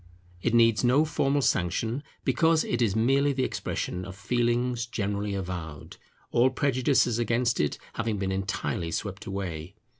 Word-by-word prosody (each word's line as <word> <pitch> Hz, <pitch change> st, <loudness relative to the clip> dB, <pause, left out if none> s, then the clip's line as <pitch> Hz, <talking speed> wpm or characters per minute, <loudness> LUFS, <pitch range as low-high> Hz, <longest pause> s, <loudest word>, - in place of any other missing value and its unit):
It 120 Hz, +4 st, +1 dB
needs 115 Hz, -1 st, +4 dB
no 130 Hz, +5 st, +4 dB
formal 140 Hz, -2 st, +1 dB
sanction, 110 Hz, -, 0 dB, 0.2 s
because 160 Hz, -1 st, +3 dB
it 120 Hz, -, -1 dB
is 110 Hz, -4 st, +2 dB
merely 135 Hz, +5 st, +3 dB
the 130 Hz, -1 st, 0 dB
expression 90 Hz, -6 st, -3 dB
of 95 Hz, 0 st, -8 dB
feelings 120 Hz, +2 st, 0 dB
generally 100 Hz, -2 st, -2 dB
avowed, 90 Hz, -5 st, -6 dB, 0.3 s
all 120 Hz, +2 st, +4 dB
prejudices 130 Hz, -2 st, +2 dB
against 120 Hz, 0 st, +1 dB
it 75 Hz, -, 0 dB, 0.2 s
having 115 Hz, -2 st, -2 dB
been 95 Hz, -1 st, -2 dB
entirely 95 Hz, -1 st, -2 dB
swept 100 Hz, +3 st, -4 dB
away. 90 Hz, -2 st, -5 dB
115 Hz, 145 wpm, -27 LUFS, 95-125 Hz, 0.3 s, needs